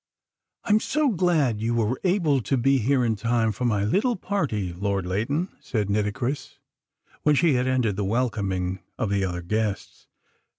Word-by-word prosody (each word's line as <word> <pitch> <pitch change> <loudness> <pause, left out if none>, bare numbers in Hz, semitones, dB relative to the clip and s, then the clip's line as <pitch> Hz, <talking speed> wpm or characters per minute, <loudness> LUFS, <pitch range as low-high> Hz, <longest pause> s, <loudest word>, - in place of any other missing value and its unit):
"I'm 210 0 +3
so 300 +5 +1
glad 160 - +1
you 115 +1 0
were 115 +2 0
able 170 -8 +2
to 135 +4 0
be 135 +2 +3
here 125 +2 +2
in 110 -1 +1
time 115 +1 +1
for 125 +5 -3
my 105 -4 +1
little 215 - +1
party, 135 - -2
Lord 100 +1 -2
Leighton," 115 - -1
said 105 -4 -2
Nitocris, 105 +7 -2 0.6
when 150 -1 +3
she 160 +1 +3
had 125 0 +1
ended 125 -6 +1
the 105 - -1
welcoming 100 -5 -1 0.2
of 105 - -1
the 100 -1 +1
other 90 -2 -3
guests. 105 +1 -3
115 Hz, 165 wpm, -25 LUFS, 100-140 Hz, 0.6 s, I'm